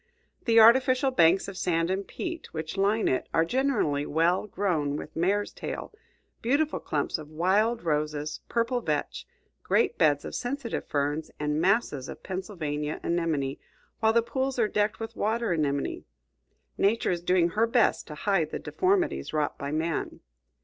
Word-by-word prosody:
The 230 Hz, -1 st, +5 dB
artificial 255 Hz, +3 st, +6 dB
banks 175 Hz, -4 st, +4 dB
of 200 Hz, -, -7 dB
sand 170 Hz, -1 st, 0 dB
and 195 Hz, +1 st, -2 dB
peat 340 Hz, -3 st, -6 dB
which 160 Hz, +2 st, -4 dB
line 205 Hz, +3 st, +2 dB
it 130 Hz, -, 0 dB
are 165 Hz, -, +4 dB
generally 215 Hz, -, +1 dB
well 170 Hz, +6 st, +1 dB
grown 170 Hz, -8 st, -1 dB
with 150 Hz, -, -7 dB
mare's 195 Hz, +5 st, 0 dB
tail, -, -, -6 dB, 0.5 s
beautiful 285 Hz, +6 st, +1 dB
clumps -, -, -2 dB
of 150 Hz, -1 st, -10 dB
wild 200 Hz, +9 st, +1 dB
roses, 150 Hz, -1 st, -1 dB
purple 235 Hz, +1 st, 0 dB
vetch, 150 Hz, -7 st, -3 dB, 0.3 s
great -, -, +1 dB
beds 145 Hz, -2 st, +3 dB
of -, -, -6 dB
sensitive 245 Hz, -1 st, -3 dB
ferns, 145 Hz, +2 st, -1 dB
and 150 Hz, +1 st, 0 dB
masses 180 Hz, -, +1 dB
of -, -, -9 dB
Pennsylvania 155 Hz, -6 st, -4 dB
anemone, 160 Hz, -5 st, -1 dB, 0.4 s
while 220 Hz, -1 st, +4 dB
the 230 Hz, 0 st, +3 dB
pools 265 Hz, +2 st, -2 dB
are 230 Hz, -3 st, +3 dB
decked 210 Hz, 0 st, 0 dB
with 225 Hz, 0 st, -6 dB
water 225 Hz, 0 st, 0 dB
anemone. 145 Hz, -4 st, -1 dB, 0.7 s
Nature 215 Hz, +1 st, +2 dB
is 175 Hz, -1 st, -2 dB
doing 175 Hz, -1 st, +3 dB
her 220 Hz, +6 st, +1 dB
best 230 Hz, 0 st, +2 dB
to 150 Hz, -, -7 dB
hide 175 Hz, -2 st, +1 dB
the -, -, -4 dB
deformities 370 Hz, -, 0 dB
wrought 150 Hz, -1 st, 0 dB
by 140 Hz, 0 st, -4 dB
man. 160 Hz, +1 st, -2 dB
185 Hz, 155 wpm, -27 LUFS, 155-230 Hz, 0.7 s, artificial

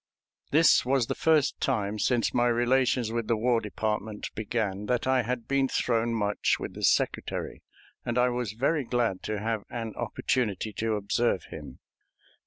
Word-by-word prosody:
This 160 Hz, +2 st, +5 dB
was 130 Hz, -1 st, +2 dB
the -, -, -2 dB
first 155 Hz, -3 st, +2 dB
time 105 Hz, -5 st, -1 dB
since 120 Hz, +1 st, +1 dB
my 120 Hz, 0 st, +3 dB
relations 120 Hz, 0 st, +2 dB
with 115 Hz, -1 st, -2 dB
the 115 Hz, -, +1 dB
War 115 Hz, +1 st, +2 dB
Department 105 Hz, 0 st, -3 dB
began 105 Hz, -2 st, -2 dB
that 125 Hz, +1 st, 0 dB
I 130 Hz, -1 st, +3 dB
had 120 Hz, 0 st, -4 dB
been 135 Hz, -1 st, +2 dB
thrown 115 Hz, -2 st, 0 dB
much 105 Hz, -2 st, +1 dB
with -, -, -6 dB
the -, -, -9 dB
Secretary, -, -, 0 dB, 0.4 s
and 120 Hz, +1 st, -2 dB
I 125 Hz, 0 st, +4 dB
was 120 Hz, -4 st, -3 dB
very 140 Hz, +6 st, 0 dB
glad 115 Hz, -6 st, -1 dB
to 110 Hz, -1 st, -2 dB
have 110 Hz, 0 st, -2 dB
an 115 Hz, -2 st, -5 dB
opportunity 110 Hz, -2 st, -1 dB
to 110 Hz, +1 st, -1 dB
observe 100 Hz, -1 st, 0 dB
him. -, -, -9 dB
115 Hz, 165 wpm, -28 LUFS, 110-125 Hz, 0.4 s, This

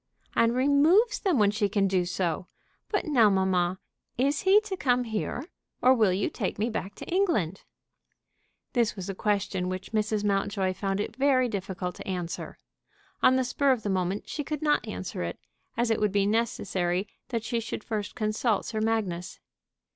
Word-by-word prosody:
"And 230 Hz, +1 st, +3 dB
removes 310 Hz, -, +4 dB
them 370 Hz, -7 st, +1 dB
when 205 Hz, -2 st, +4 dB
she 210 Hz, -1 st, 0 dB
can 200 Hz, 0 st, +2 dB
do 185 Hz, -2 st, +1 dB
so. 180 Hz, -1 st, -2 dB, 0.4 s
But 410 Hz, -, 0 dB
now, 245 Hz, -9 st, +5 dB
mamma, 185 Hz, -2 st, +1 dB, 0.4 s
is 280 Hz, +4 st, +2 dB
he 385 Hz, +2 st, +6 dB
to 425 Hz, -3 st, -4 dB
come 250 Hz, -7 st, +2 dB
here, 225 Hz, +4 st, -3 dB, 0.3 s
or 255 Hz, -, +6 dB
will 220 Hz, -6 st, +3 dB
you 190 Hz, +2 st, 0 dB
take -, -, -3 dB
me 220 Hz, +4 st, 0 dB
back 200 Hz, -2 st, -4 dB
to -, -, -8 dB
England?" 335 Hz, -, 0 dB, 1.1 s
This 235 Hz, -5 st, +2 dB
was 190 Hz, -1 st, -6 dB
a -, -, -2 dB
question 195 Hz, -2 st, -1 dB
which 185 Hz, 0 st, -5 dB
Mrs. 215 Hz, -1 st, 0 dB
Mountjoy 195 Hz, -2 st, 0 dB
found 195 Hz, +1 st, -2 dB
it 210 Hz, -, -3 dB
very 265 Hz, -2 st, +3 dB
difficult 190 Hz, -4 st, -4 dB
to -, -, -9 dB
answer. 180 Hz, -3 st, -4 dB, 0.6 s
On 260 Hz, -, +6 dB
the 260 Hz, -, +2 dB
spur 275 Hz, +2 st, +2 dB
of 245 Hz, -4 st, 0 dB
the 205 Hz, -, -2 dB
moment 185 Hz, +1 st, -1 dB
she 295 Hz, -, -3 dB
could 300 Hz, +1 st, -4 dB
not 295 Hz, -1 st, +2 dB
answer -, -, -5 dB
it, -, -, -3 dB, 0.4 s
as 235 Hz, -1 st, +2 dB
it 225 Hz, -, +1 dB
would 210 Hz, -1 st, +2 dB
be 200 Hz, 0 st, +2 dB
necessary 195 Hz, -4 st, 0 dB, 0.2 s
that 230 Hz, -3 st, -2 dB
she 235 Hz, +1 st, -1 dB
should 225 Hz, -1 st, -5 dB
first 210 Hz, -2 st, -4 dB
consult 215 Hz, 0 st, 0 dB
Sir 220 Hz, -1 st, -3 dB
Magnus. 205 Hz, -6 st, -1 dB
215 Hz, 180 wpm, -27 LUFS, 190-255 Hz, 1.1 s, he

